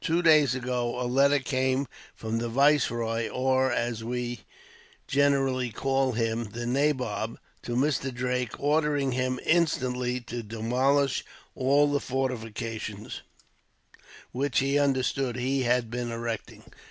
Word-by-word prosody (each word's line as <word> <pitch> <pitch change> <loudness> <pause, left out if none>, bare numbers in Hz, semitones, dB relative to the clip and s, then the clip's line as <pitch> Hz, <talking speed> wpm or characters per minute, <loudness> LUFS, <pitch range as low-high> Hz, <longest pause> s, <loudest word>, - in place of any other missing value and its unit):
Two 170 +2 +1
days 150 -6 +5
ago 125 -1 -2
a 125 - -1
letter 140 +3 +4
came 130 0 0 0.3
from 110 +1 -3
the 120 0 -2
viceroy; 120 -4 +2
or, 130 0 +1
as 115 -1 -1
we 120 +1 -3 0.7
generally 135 -2 +2
call 135 +3 0
him, 115 0 -1
the 120 +1 -4
nabob, 125 -4 0 0.2
to 120 - -4
Mr. 135 0 +1
Drake, 125 -1 -2
ordering 145 -2 +1
him 130 0 -1
instantly 125 -7 +1
to 120 0 -5
demolish 125 +6 +1 0.3
all 140 +3 +3
the 145 - +2
fortifications 115 -5 -4 1.1
which 135 0 -1
he 140 +2 +3
understood 135 -2 +1
he 130 +2 0
had 120 -2 +1
been 120 0 -3
erecting. 115 -1 -5
125 Hz, 125 wpm, -27 LUFS, 120-135 Hz, 1.1 s, days